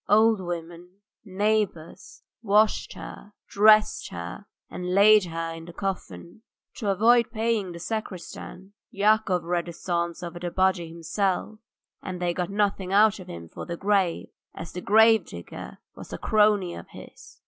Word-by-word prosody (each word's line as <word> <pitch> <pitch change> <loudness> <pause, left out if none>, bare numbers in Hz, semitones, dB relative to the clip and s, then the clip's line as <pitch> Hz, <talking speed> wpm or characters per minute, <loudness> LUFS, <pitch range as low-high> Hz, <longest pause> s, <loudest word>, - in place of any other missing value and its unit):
Old 220 0 +5
women, 175 0 -7 0.3
neighbours, 200 -4 -2 0.2
washed 215 0 +2
her, 205 - -11
dressed 215 +1 +4
her, 85 - -8 0.2
and 180 0 -4
laid 210 0 +6
her 165 -1 -4
in 165 0 -9
the 175 - -11
coffin. 185 - -6 0.4
To 210 - -2
avoid 230 +4 +4
paying 220 -4 -1
the 170 - -8
sacristan, 190 -1 -7 0.2
Yakov 200 -3 +2
read 175 0 -2
the 170 - -7
psalms 170 +1 -3
over 175 0 -6
the 175 0 -3
body 185 -2 +1
himself, 190 +5 -2 0.4
and 185 -2 -6
they 175 -1 0
got 175 0 -3
nothing 200 -2 -1
out 210 +1 +4
of 185 - -11
him 85 -1 -8
for - - -9
the 170 -1 -5
grave, 195 -3 0 0.3
as 165 - -8
the 180 - -6
grave 220 +1 +5
digger 85 0 -9 0.2
was - - -12
a - - -4
crony 210 -4 +2
of - - -9
his. - - -14
190 Hz, 155 wpm, -25 LUFS, 170-210 Hz, 0.4 s, laid